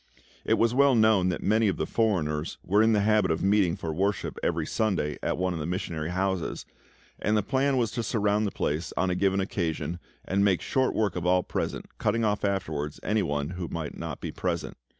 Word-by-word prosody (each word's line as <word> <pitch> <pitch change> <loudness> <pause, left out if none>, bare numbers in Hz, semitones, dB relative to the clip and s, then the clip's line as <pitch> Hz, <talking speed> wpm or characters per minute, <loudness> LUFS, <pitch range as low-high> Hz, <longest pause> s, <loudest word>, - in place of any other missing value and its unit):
It - - +2
was 115 0 +2
well 140 0 +5
known 110 -5 +4
that 90 - -3
many 110 +2 +3
of 95 - 0
the - - -1
foreigners 80 -9 0
were 100 +4 +3
in 110 0 +4
the 105 - +3
habit 105 -2 +3
of 80 - 0
meeting 95 -3 +3
for 85 -5 -4
worship 100 +4 -1
every 80 -2 0
Sunday 100 -6 0
evening - - -9
at - - 0
one 90 0 0
of 85 - -4
the 75 - -3
missionary 85 -3 -3
houses, 95 -1 -2 0.5
and 105 0 +1
the 105 - +1
plan 135 +2 +1
was 115 -4 +1
to 120 - -2
surround 105 -1 +1
the - - -3
place 75 +4 -2
on 95 -1 +1
a - - 0
given 95 +1 +2
occasion 85 -3 -2 0.3
and 100 +1 +1
make 95 -3 +3
short 130 -1 0
work 105 -4 +1
of 90 0 -2
all 90 0 +3
present, - - -3
cutting 115 +2 +1
off 105 -1 0
afterwards 80 -7 -2
any 105 0 +1
who 80 +3 -2
might 80 -3 -4
not - - -5
be - - -4
present. - - -3
95 Hz, 215 wpm, -27 LUFS, 85-110 Hz, 0.5 s, well